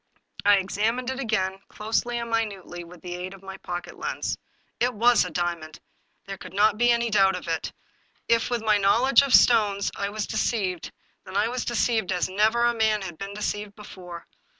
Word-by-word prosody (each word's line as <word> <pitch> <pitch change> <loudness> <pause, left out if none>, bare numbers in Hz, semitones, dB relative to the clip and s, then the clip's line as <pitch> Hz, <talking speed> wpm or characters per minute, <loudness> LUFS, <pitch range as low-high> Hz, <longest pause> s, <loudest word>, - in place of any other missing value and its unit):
I 205 0 +6
examined 220 +6 -1
it 265 - -5
again, 195 -6 -1
closely 230 +3 -2
and 235 -1 -4
minutely, 200 -6 -3
with 170 0 -14
the 175 -1 -5
aid 180 +2 -6
of 195 - -18
my 195 0 -8
pocket 175 -2 -7
lens. - - -3 0.4
It 245 0 +1
was 235 +2 +4
a 180 - -4
diamond; 170 -2 -3 0.5
there 195 -1 -7
could 185 - -10
not 210 +1 +4
be 240 +2 +3
a 235 -1 +1
doubt 195 -2 +4
of 180 - -7
it. 165 -1 -2 0.6
If, 230 -1 +2
with 240 -2 -1
my 215 -2 +3
knowledge 235 +8 +5
of 280 -1 -2
stones, 205 -4 +4
I 200 - -2
was 215 0 -3
de 215 - -4
ceived, 190 -8 -1 0.3
then 195 - -5
I 210 +3 +2
was 250 0 -3
deceived 230 -4 0
as 180 -1 0
never 220 +5 +2
man 220 -2 +1
had 175 -4 -8
been 195 0 -6
deceived 210 0 -4
before. 180 -5 -10
205 Hz, 195 wpm, -25 LUFS, 190-230 Hz, 0.6 s, I